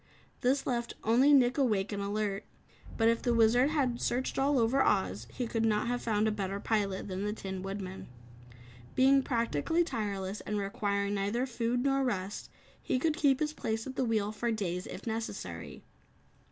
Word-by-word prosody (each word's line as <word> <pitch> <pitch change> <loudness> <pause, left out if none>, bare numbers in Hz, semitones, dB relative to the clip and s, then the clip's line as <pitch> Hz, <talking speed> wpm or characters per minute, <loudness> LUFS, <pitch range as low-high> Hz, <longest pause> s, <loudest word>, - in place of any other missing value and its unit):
This 270 +3 +1
left 235 -2 -2
only 245 +6 +5
Nick 260 -1 +5
awake 215 -7 +1
and 200 -1 -3
alert. 200 0 -2 0.5
But 225 - +3
if 230 0 +2
the 240 -1 +1
Wizard 235 +4 +5
had 260 -6 0
searched 255 +2 -1
all 275 +1 +3
over 245 +3 +3
Oz, 120 - +1
he 250 - -3
could 225 -1 -1
not 215 -2 +2
have 245 +1 -1
found 215 -1 +1
a - - +2
better 200 -1 -3
pilot 200 -3 -1
than 190 0 -3
the 210 0 -1
Tin 190 -3 -5
Woodman. 195 -1 -6 0.9
Being 270 +1 +5
practically 235 - +1
tireless 205 - -3
and 210 - -3
requiring 200 0 -1
neither 205 +5 0
food 245 -1 -1
nor 275 0 +2
rest, 200 -5 -3 0.3
he - - 0
could 310 +4 +1
keep 285 -5 +3
his 305 -1 -1
place 225 -6 -3
at 265 - -6
the 265 - 0
wheel 215 -3 0
for 235 +2 -2
days 185 -4 -2
if - - -8
necessary. 225 +1 -5
225 Hz, 180 wpm, -31 LUFS, 200-255 Hz, 0.9 s, only